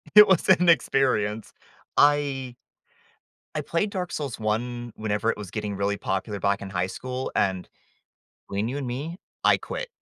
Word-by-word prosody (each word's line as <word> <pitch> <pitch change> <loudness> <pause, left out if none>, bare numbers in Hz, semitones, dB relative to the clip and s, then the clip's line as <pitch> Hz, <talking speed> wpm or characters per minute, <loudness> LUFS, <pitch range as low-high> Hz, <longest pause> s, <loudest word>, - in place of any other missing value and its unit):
it 210 0 +11
was 190 -3 +3
an 180 -1 +6
experience. 110 -9 +2 0.4
I 140 -4 +3 1.0
I - - -1
played 185 +5 -1
Dark 180 -3 -4
Souls 140 -6 -4
one, 120 +2 -2
whenever 110 +1 0
it - - -3
was 105 -3 -7
getting 105 -2 -3
really 100 +1 0
popular 100 +2 -3
back 100 +1 +1
in 100 - -6
high 90 -1 0
school, 130 +5 -5
and, 95 -2 0 0.8
between 100 +3 -1
you 135 - -3
and 140 - -3
me, 145 +8 -4 0.3
I - - +5
quit. - - -5
120 Hz, 160 wpm, -25 LUFS, 105-145 Hz, 1.0 s, it